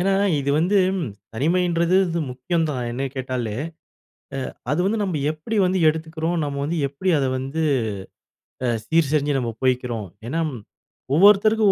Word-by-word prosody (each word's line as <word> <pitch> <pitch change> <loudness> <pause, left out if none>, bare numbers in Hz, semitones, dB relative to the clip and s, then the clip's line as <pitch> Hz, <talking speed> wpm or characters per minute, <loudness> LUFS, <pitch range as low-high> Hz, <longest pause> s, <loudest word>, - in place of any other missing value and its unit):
ஏன்னா 195 +2 +2 0.3
இது 140 0 -1
வந்து, 180 +5 +2 0.6
தனிமைன்றது 170 +5 +2
இது 170 -1 -1
முக்கியம் 165 +7 -1
தான் 125 -3 -3
என்னைய 135 +3 -2
கேட்டாலே. 125 -4 -3 1.0
அ - - -21 0.2
அது 150 - +1
வந்து 215 +2 +1
நம்ப 185 -6 -1
எப்புடி 155 +8 -5
வந்து 185 +1 +1
எடுத்துக்கிறோம். 160 +2 -1
நம்ம 140 -1 -3
வந்து 165 +3 -2
எப்டி 145 +7 -3
அத 140 - +1
வந்து, 135 +5 -3 1.0
அ - - +1 0.2
சீர் 160 -4 +2
செஞ்சு 145 -1 +2
நம்ம 120 -2 -2
போய்க்கிறோம். 125 -5 0 0.2
ஏன்னா, 160 +6 -1 0.7
ஒவ்வொருத்தருக்கும் 205 +3 +6
160 Hz, 145 wpm, -23 LUFS, 130-180 Hz, 1.0 s, ஒவ்வொருத்தருக்கும்